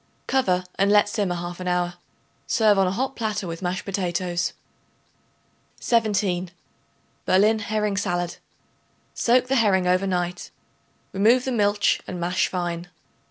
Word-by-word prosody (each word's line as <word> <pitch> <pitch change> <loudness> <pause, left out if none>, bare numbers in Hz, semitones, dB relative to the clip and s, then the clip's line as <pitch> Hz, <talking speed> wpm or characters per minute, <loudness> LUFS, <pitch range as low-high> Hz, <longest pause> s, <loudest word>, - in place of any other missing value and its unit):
Cover 185 -9 +1 0.2
and 200 +1 +3
let 205 0 +5
simmer 205 -5 -1
half 175 +1 -6
an 180 - -5
hour. 180 0 0 0.5
Serve 215 -3 +3
hot 190 -1 +3
on 245 +9 -1
a - - -26
platter 215 -4 -3
with 165 0 -6
mashed 180 +1 -3
potatoes. 180 -2 -2 1.3
17. 200 -6 +1 0.8
Berlin 210 +4 +4
Herring 210 -1 -1
Salad. 175 -3 -2 0.8
Soak 245 +2 +3
the 270 +1 +1
herring 195 -5 +3
over 185 +2 +2
night; 180 -1 -2 0.6
remove 230 +6 +3
the 260 - -1
milch 205 -3 +2
and 180 - -5
mash 175 +1 +1
fine. 175 -1 -3
190 Hz, 135 wpm, -24 LUFS, 180-215 Hz, 1.3 s, let